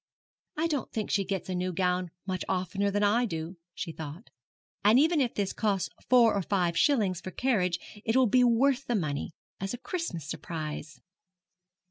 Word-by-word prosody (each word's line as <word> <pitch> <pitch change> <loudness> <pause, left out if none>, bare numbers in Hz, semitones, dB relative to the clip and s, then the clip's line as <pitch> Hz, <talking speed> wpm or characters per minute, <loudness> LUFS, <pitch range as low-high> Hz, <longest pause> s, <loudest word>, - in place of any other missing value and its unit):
'I 315 - +1
don't 295 -7 -1
think 215 -2 -3
she 200 - +2
gets 190 -1 -3
a 185 - -3
new 180 +1 -1
gown 180 0 0 0.2
much 185 -1 -2
oftener 190 +2 0
than 205 +1 0
I 230 +4 +3
do,' 165 0 -5 0.2
she 165 - -4
thought; 155 -2 -8 0.5
'and 210 +4 +6
even 315 +1 +4
if 245 -3 0
this 200 -2 -1
costs 200 -4 0 0.2
four 240 -3 +6
or 200 - +1
five 180 -2 0
shillings 200 - +2
for 185 - -6
carriage 185 -6 +1 0.3
it 225 - 0
will 260 -1 +6
be 250 +3 +4
worth 260 +3 +3
the 240 - +1
money, 150 -8 -1 0.3
as 195 +4 -3
a - - -9
Christmas 245 - -4
surprise.' 155 -2 -5
195 Hz, 180 wpm, -29 LUFS, 180-240 Hz, 0.5 s, and